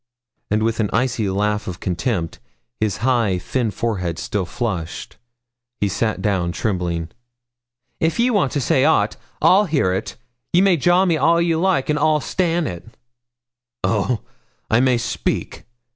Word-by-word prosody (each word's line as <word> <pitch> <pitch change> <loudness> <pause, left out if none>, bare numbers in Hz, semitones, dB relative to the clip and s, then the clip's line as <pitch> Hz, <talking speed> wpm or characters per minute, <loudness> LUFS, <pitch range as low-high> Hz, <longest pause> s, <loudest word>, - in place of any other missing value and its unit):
And 105 +1 +1
with 115 0 0
an 105 -2 +1
icy 115 -3 0
laugh 105 +2 -1
of 90 -2 -5
contempt, 90 -2 -2 0.4
his 110 -3 0
high, 115 -8 +2
thin 120 +5 -1
forehead 95 -5 -2
still 95 -1 -2
flushed, 90 -5 -4 0.6
he 100 - +1
sat 110 +3 -1
down 95 -4 0
trembling. 85 -5 -2 0.9
'If 160 0 +1
you 240 +1 +2
want 185 -11 +2
to 145 - 0
say 135 +1 +2
aught, 105 -9 +3 0.3
I'll 200 +3 +6
hear 140 - +1
ye. 95 - 0 0.5
Ye 175 - +5
may 195 -2 +5
jaw 175 +5 +3
me 170 -3 +2
all 170 +2 +3
ye 170 -1 +2
like, 175 -4 +1
and 150 -1 +1
I'll 155 0 +3
stan' 175 +1 0
it.' 90 +1 -7 0.9
'Oh, 110 +1 0 0.5
I 110 - +5
may 130 -1 +3
speak? 115 - -3
115 Hz, 155 wpm, -21 LUFS, 100-155 Hz, 0.9 s, I'll